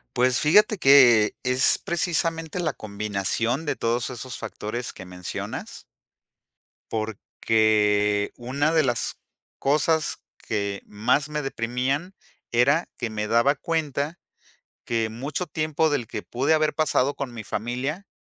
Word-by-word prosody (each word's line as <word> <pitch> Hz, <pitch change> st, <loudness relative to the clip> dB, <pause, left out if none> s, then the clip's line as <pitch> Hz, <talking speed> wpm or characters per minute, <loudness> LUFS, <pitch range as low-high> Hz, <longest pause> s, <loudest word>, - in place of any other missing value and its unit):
Pues, 125 Hz, 0 st, +3 dB
fíjate 210 Hz, +6 st, +4 dB
que 125 Hz, -7 st, +6 dB
es 125 Hz, +1 st, +3 dB
precisamente 165 Hz, -1 st, -1 dB
la 155 Hz, -4 st, 0 dB
combinación 105 Hz, +6 st, -2 dB
de -, -, -1 dB
todos 115 Hz, +2 st, -1 dB
esos 125 Hz, 0 st, -6 dB
factores 120 Hz, +4 st, -5 dB
que 95 Hz, -, -11 dB
mencionas 90 Hz, -1 st, -6 dB, 1.1 s
porque, 105 Hz, -1 st, +1 dB
una 140 Hz, +6 st, 0 dB
de 160 Hz, -2 st, +4 dB
las 120 Hz, -3 st, -1 dB, 0.4 s
cosas 155 Hz, +3 st, +1 dB
que 100 Hz, -2 st, -3 dB
más 115 Hz, +8 st, 0 dB
me 150 Hz, 0 st, -2 dB
deprimían 135 Hz, +7 st, -2 dB, 0.4 s
era 140 Hz, +8 st, +3 dB
que 120 Hz, -3 st, -3 dB
me 105 Hz, -1 st, -3 dB
daba 120 Hz, +6 st, +3 dB
cuenta 150 Hz, +1 st, -2 dB, 0.7 s
que 115 Hz, -1 st, 0 dB
mucho 140 Hz, +10 st, -4 dB
tiempo 155 Hz, 0 st, 0 dB
del 130 Hz, -6 st, -1 dB
que 105 Hz, -, -5 dB
pude 135 Hz, +6 st, +1 dB
haber 155 Hz, -1 st, +1 dB
pasado 145 Hz, -3 st, +1 dB
con 135 Hz, -3 st, -5 dB
mi 115 Hz, -2 st, -7 dB
familia 125 Hz, -, -3 dB
125 Hz, 125 wpm, -25 LUFS, 110-150 Hz, 1.1 s, que